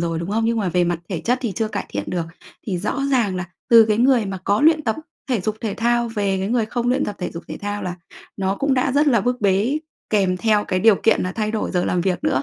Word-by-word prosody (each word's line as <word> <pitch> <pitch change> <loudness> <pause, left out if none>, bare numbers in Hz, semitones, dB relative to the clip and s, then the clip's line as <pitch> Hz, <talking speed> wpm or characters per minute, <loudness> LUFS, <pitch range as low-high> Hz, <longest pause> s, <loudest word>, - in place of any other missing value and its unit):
rồi 165 -1 -1
đúng 170 +3 -4
không? 225 +2 0
Nhưng 230 +1 +1
mà 200 - 0
về 180 0 +2
mặt 175 -1 -1
thể 175 -5 -3
chất 245 +9 0
thì 235 -5 -2
chưa 220 +4 -2
cải - - -4
thiện 100 0 -4
được, 175 -2 -2 0.4
thì 190 -5 -1
rõ 210 +9 -2
ràng 220 -8 +1
là 180 - -3 0.3
từ 230 -1 +9
cái 215 +1 +2
người 245 -3 +3
mà 195 -1 -4
có 205 +1 +2
luyện 310 0 +4
tập 220 - 0 0.3
thể 240 -5 +1
dục 215 +3 -2
thể 220 -3 -3
thao 235 0 +1
về 200 -4 -1
cái 190 +2 -2
người 230 -2 +1
không 240 +2 -2
luyện 260 +3 +2
tập 205 - -4
thể 180 - -3
dục 170 - -8
thể - - -5
thao 205 0 -3
là 180 -1 -4 0.4
nó 195 0 -1
cũng 275 +2 +1
đã 255 +1 +1
rất 290 +2 +3
là 235 -7 +4
bức 245 +3 -1
bế 205 +8 +2 0.3
kèm 190 -4 +2
theo 210 +1 +2
cái 185 - -1
điều 220 +1 +6
kiện 225 - +3
là 185 - -2
thay 215 0 -2
đổi 220 -1 -2
giờ 180 -2 0
làm 180 - 0
việc 180 0 -1
nữa, 130 - +1
210 Hz, 285 wpm, -21 LUFS, 185-235 Hz, 0.4 s, từ